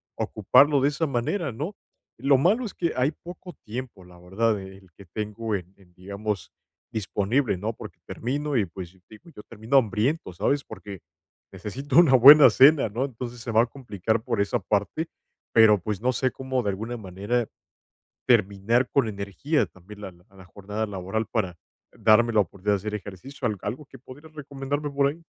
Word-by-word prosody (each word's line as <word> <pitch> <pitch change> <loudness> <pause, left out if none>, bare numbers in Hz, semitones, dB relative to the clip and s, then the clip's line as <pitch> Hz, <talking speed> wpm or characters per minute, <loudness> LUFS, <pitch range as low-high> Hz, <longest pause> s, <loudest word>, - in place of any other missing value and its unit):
ocuparlo 145 0 +3
de 140 - +3
esa 155 +3 -2
manera, 140 +5 -2
¿no?, 150 - -5 0.4
lo 135 +2 +3
malo 200 - +2
es 210 - -6
que 170 -2 -1
hay 130 +2 +2
poco 175 +3 -11
tiempo, 115 -3 -7
la 90 -1 -16
verdad, 105 +5 0
el 95 -1 -13
que 100 - -13
tengo 105 +4 -4
en 90 0 -7
en, 90 -3 -23
digamos, 100 0 -5 0.4
disponible, 110 +2 -1
¿no?, 105 +5 -3
porque - - -11
termino 145 +4 -3
y, 110 - +2
pues, 90 0 -10
digo, 110 +11 -15
yo - - -9
termino 115 +5 -1
hambriento, 115 - 0
¿sabes?, 140 +10 0
porque 100 -3 -10 0.5
necesito 135 +6 -3
una 145 -7 +6
buena 140 +4 +10
cena, 140 -2 +5
¿no?, 120 +6 -2
entonces, 125 -2 -7
se 115 - -5
va 110 +1 +5
a - - 0
complicar 110 -4 -3
por 115 -5 -1
esa 100 - 0
parte, 105 +11 -1 0.5
pero, 110 -2 +6
pues, 105 +2 -4
no 130 +2 +1
sé 130 +1 0
cómo 130 -1 -3
de 105 - -1
alguna 110 +5 -5
manera, 105 +4 -2 0.8
terminar 115 +1 +2
con 135 -5 +2
energía 100 +9 -1
también 100 +3 -15
la 95 - -7
la 95 +2 -18
jornada 105 +3 -5
laboral, 100 +3 -3
para 95 -6 -2 0.4
darme 115 +2 +3
la 110 - +4
oportunidad 100 +2 -1
de - - +2
hacer 105 +2 -5
ejercicio, 105 +7 -7
¿al 105 -3 -2
algo 125 +8 -5
que 135 - -14
podrías 145 +5 -14
recomendarme 145 0 -4
por 140 0 +2
ahí? 160 +4 -7
115 Hz, 175 wpm, -25 LUFS, 100-135 Hz, 0.8 s, buena